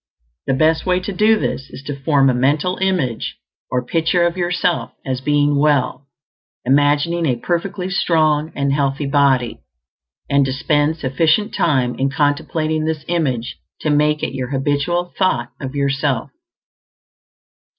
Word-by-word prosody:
The 135 - +2
best 160 +3 +2
way 180 0 +2
to 195 +2 -5
do 215 +3 +4
this 135 -8 -3
is 130 - -10
to 145 0 -5
form 140 0 +2
a 130 - +3
mental 150 +8 +1
image 180 -12 -1 0.3
or 125 0 -1
picture 165 +4 +1
of 170 0 0
yourself 175 -1 -1
as 130 -1 -2
being 145 +1 +2
well, 140 -2 +1 0.6
imagining 145 +5 +2
a 125 - +1
perfectly 180 +7 -2
strong 155 -4 +1
and 140 -1 0
healthy 140 0 0
body; 135 -3 +1 0.7
and 140 0 +3
to 130 - -2
spend 145 +3 +1
sufficient 160 +9 +1
time 135 -9 +1
in 135 +1 +1
contemplating 155 +2 0
this 155 -1 -3
image 135 -9 -1 0.2
to 155 - 0
make 150 +1 +2
it - - -2
your 130 -2 -3
habitual 145 +6 -1
thought 125 -11 +1
of 135 0 -6
yourself. 140 -2 -1
145 Hz, 145 wpm, -19 LUFS, 135-165 Hz, 0.7 s, do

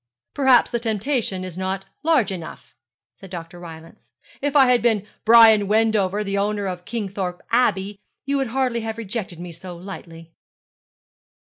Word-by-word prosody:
'Perhaps 265 -4 +4
the 235 - 0
temptation 220 -3 -2
is 185 -1 -7
not 190 +1 -3 0.2
large 305 -10 +2
enough,' 170 -4 -8 0.4
said 195 - -14
Dr. 175 -1 -8
Rylance. 160 -8 -12 0.3
'If 285 +1 -1
I 275 -2 +7
had 250 -1 +3
been 220 -4 +1 0.2
Brian 220 -2 +7
Wendover, 210 -2 +2
and 210 - -5
the 200 0 0
owner 205 0 -1
of 180 -2 -5
Kingthorpe 195 -5 -4
Abbey, 205 -4 +1 0.3
you 280 +1 0
would 270 -1 0
hardly 250 0 0
have 225 0 -5
rejected 205 -5 -5
me 175 0 -7
so 175 +2 -10
lightly.' 165 -3 -10
205 Hz, 155 wpm, -22 LUFS, 185-235 Hz, 0.4 s, I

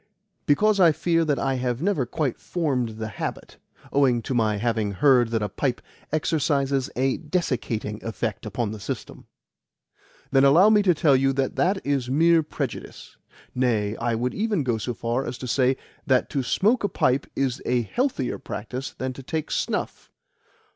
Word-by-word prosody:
"Because 205 +8 +3
I 170 -3 +7
fear 165 +2 +1
that 145 -3 +1
I 135 -1 0
have 125 -1 -1
never 170 -7 0
quite 135 -1 -2
formed 130 -10 -2
the 110 0 -4
habit, 110 - -6 0.4
owing 130 -4 +3
to 130 - -3
my 110 -3 +2
having 110 -2 -1
heard 125 0 +4
that 115 -2 -1
a - - 0
pipe 125 +5 -2 0.3
exercises 140 -3 0
a 130 +1 +1
desiccating 120 - -2
effect 110 -2 -4
upon 110 +1 -2
the 110 - -7
system." 100 - -7 1.0
"Then 135 0 +4
allow 170 +10 +6
me 210 -1 +5
to 180 -4 +3
tell 150 -3 +4
you 135 +1 +2
that 135 0 -1
that 190 +2 +1
is 135 -3 0
mere 165 +4 +4
prejudice. 145 -4 -6 0.4
Nay, 115 -5 0
I 115 0 -1
would 125 +2 -1
even 210 -6 0
go 120 -4 0
so 120 +2 -3
far 120 +4 -1
as 125 - -5
to 125 - -6
say 130 +2 +2 0.3
that 130 -1 +2
to 140 - 0
smoke 210 - +1
a 205 - +1
pipe 135 -5 +1
is 130 -2 -1
a 125 -1 +2
healthier 240 - -1
practice 125 +6 -6
than 130 0 -3
to 135 - -9
take 155 +3 -4
snuff. - - -2
130 Hz, 175 wpm, -24 LUFS, 120-155 Hz, 1.0 s, I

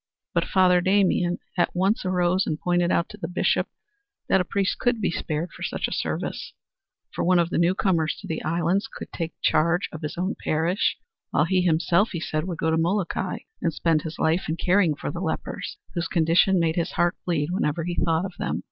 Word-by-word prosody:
But - - +1
Father 180 -2 +4
Damien 185 -2 +2 0.2
at 175 - +1
once 190 +3 +1
arose 185 0 +1
and 155 -1 -2
pointed 175 0 +1
out 170 - +2
to 210 - -10
the 175 -5 -4
Bishop 180 - +1 0.6
that 190 - +4
a - - +1
priest 195 +1 -1
could 245 -2 +1
be 195 - 0
spared 160 +1 -3
for - - -14
such - - -2
service, - - -3 0.6
for - - -2
one 180 +1 +4
of 170 0 +1
the - - +1
newcomers 170 -2 +1
to - - -9
the 160 - -3
islands 170 +6 0
could - - -9
take 165 -1 -4
charge 170 +4 +2
of 160 - -8
his 150 +1 -5
own 185 +4 -1
parish, 165 +5 +1 0.3
while - - +2
he 185 -1 +2
himself, 170 +4 +2
he 170 - -2
said, 155 -1 -2
would 175 -3 -4
go 160 0 0
to 160 - +2
Molokai 180 +2 -1 0.2
and 170 - +1
spend 165 -2 +2
his 160 +1 -6
life 160 +2 +1
in 160 - -1
caring 180 -4 +3
for - - -4
the - - -5
lepers, - - -4 0.2
whose 170 -1 -1
condition 170 +3 +3
made 165 0 +1
his 170 - -1
heart 175 0 +2
bleed 165 -2 -1
whenever 165 -3 0
he 175 +1 -2
thought 165 +1 +1
of 190 - -6
them. - - -1
175 Hz, 210 wpm, -25 LUFS, 165-185 Hz, 0.6 s, Father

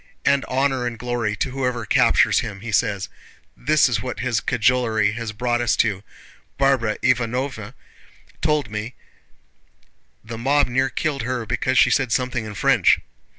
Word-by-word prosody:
'And 140 -1 +3
honor 130 -1 0
and 120 -1 -5
glory 120 -2 -2
to 130 - -2
whoever 125 -3 -2
captures - - +3
him,' 100 -2 -6
he 115 +1 -6
says. 100 -1 0 0.5
This 150 +3 +3
is 115 -4 -1
what 125 +2 -5
his 120 -3 0
cajolery 110 -3 +1
has 115 0 -5
brought 120 +2 -1
us 120 - +2
to! 100 -4 0 0.6
Barbara 135 -6 +1
Ivánovna 125 -1 -1 0.7
told 150 -8 0
me 105 +4 -5 1.3
the 115 +1 -8
mob 140 +4 +2
near 130 +2 0
killed 140 +1 -2
her 120 0 -3
because 120 +4 -1
she - - +5
said 135 -4 +1
something 125 -2 -1
in 105 - -8
French." - - +3
120 Hz, 150 wpm, -22 LUFS, 110-130 Hz, 1.3 s, she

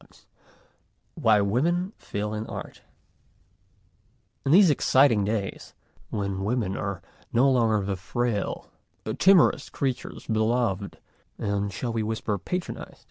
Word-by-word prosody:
XV - - -23 0.9
WHY 105 -2 +3
WOMEN 170 - 0
FAIL 105 +1 -4
IN 110 +1 -4
ART - - -8 1.6
IN 135 - 0
these 180 0 +7
exciting 130 -6 +4
days, 100 -1 -3 0.3
when 100 -2 -3
women 105 -3 -1
are 100 -3 -4 0.3
no 120 +4 +4
longer 110 -5 +2
the 100 0 -1
frail, 110 +2 -3 0.5
timorous 185 -6 +5
creatures 130 -3 -3
beloved 110 -3 0 0.4
and 100 0 -1
shall 115 +5 -4
we 115 - 0
whisper 110 -1 -2
patronized? 180 - -5
110 Hz, 115 wpm, -26 LUFS, 100-130 Hz, 1.6 s, these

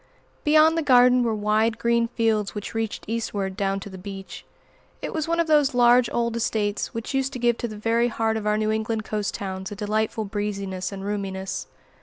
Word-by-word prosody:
Beyond 310 +2 +5
the 330 - +1
garden 250 -3 +5
were 230 -2 +1
wide 215 +2 +1
green 235 0 +2
fields 225 -3 0
which 205 - -5
reached 225 -1 -3
eastward 205 -4 -2
down 195 0 -1
to - - -8
the 190 - -9
beach. 195 0 -8 0.6
It - - -5
was 315 -1 -2
one 335 0 0
of 335 - +3
those 295 -5 +3
large 245 0 +5
old 235 -1 0
estates 215 -3 -1
which 230 +3 -5
used 270 0 0
to - - -4
give 240 -1 +1
to 240 - -2
the 215 -2 -8
very 230 +2 +2
heart 225 -1 0
of 215 -1 -3
our 210 0 +2
New 215 0 0
England 220 0 -1
coast 210 -2 -3
towns 190 -1 -5
a - - -5
delightful 215 +1 -1
breeziness 200 -2 -3
and 195 -1 -6
roominess. 195 -2 -3
220 Hz, 205 wpm, -24 LUFS, 205-240 Hz, 0.6 s, Beyond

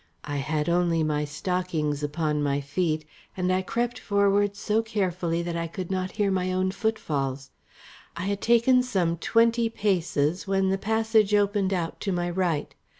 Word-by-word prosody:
I 145 -1 -4
had 150 +2 -1
only 170 -1 +2
my 150 -1 0
stockings 155 -1 -2
upon 150 0 -1
my 140 -1 +1
feet 155 +2 -1 0.3
and 185 0 +1
I 185 - +2
crept 235 +5 -2
forward 200 0 +2
so 215 +2 0
carefully 185 -6 -1
that 170 -1 -3
I 170 0 -2
could 180 +2 -6
not 185 -1 -2
hear 205 -2 +1
my 185 -1 0
own 185 0 0
footfalls. 145 - -2 0.7
I 170 - -3
had 200 +1 -2
taken 235 +2 +4
some 185 -9 0
twenty 230 +5 +2
paces 180 -5 0
when 195 0 +2
the 195 0 0
passage 220 -1 +2
opened 205 -1 +2
out 175 -4 -2
to 195 - -2
my 175 -1 -1
right. 175 -5 -1
185 Hz, 165 wpm, -26 LUFS, 160-205 Hz, 0.7 s, taken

